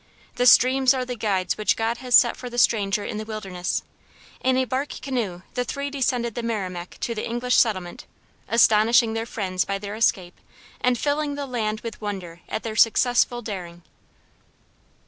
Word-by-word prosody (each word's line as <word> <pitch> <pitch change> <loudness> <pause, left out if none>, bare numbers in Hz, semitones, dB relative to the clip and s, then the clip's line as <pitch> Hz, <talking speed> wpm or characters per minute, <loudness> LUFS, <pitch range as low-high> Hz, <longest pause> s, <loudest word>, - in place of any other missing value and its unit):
The 245 - +1
streams 260 +2 +6
are 255 -1 -2
the 250 0 -5
guides 200 -5 -1
which 215 - +2
God 225 +1 -1
has 250 -1 +2
set 240 - +6
for 250 - -8
the 240 - -8
stranger 205 -4 +2
in 215 - -4
the - - -4
wilderness: 195 -5 -4 0.6
in 255 0 +2
a 260 - +2
bark 260 +4 -2
canoe 220 -10 -3
the 250 - -1
three 280 +3 -4
descend 255 -3 0
the 235 0 -4
Merrimac 185 -6 -4
to 235 - -2
the 215 - -4
English 245 +2 -1
settlement, 185 -7 0 0.4
astonishing 230 +1 +4
their 225 +1 -3
friends 185 -5 -2
by 200 - -3
their 200 0 -7
escape 190 -5 0 0.4
and 250 -1 +3
filling 290 +2 -1
the 285 0 -4
land 220 -4 -2
with 230 -2 -7
wonder 185 -5 -6
at - - -3
their 220 -1 -4
successful 240 +2 +3
daring." 175 -5 -7
225 Hz, 175 wpm, -24 LUFS, 200-250 Hz, 0.6 s, streams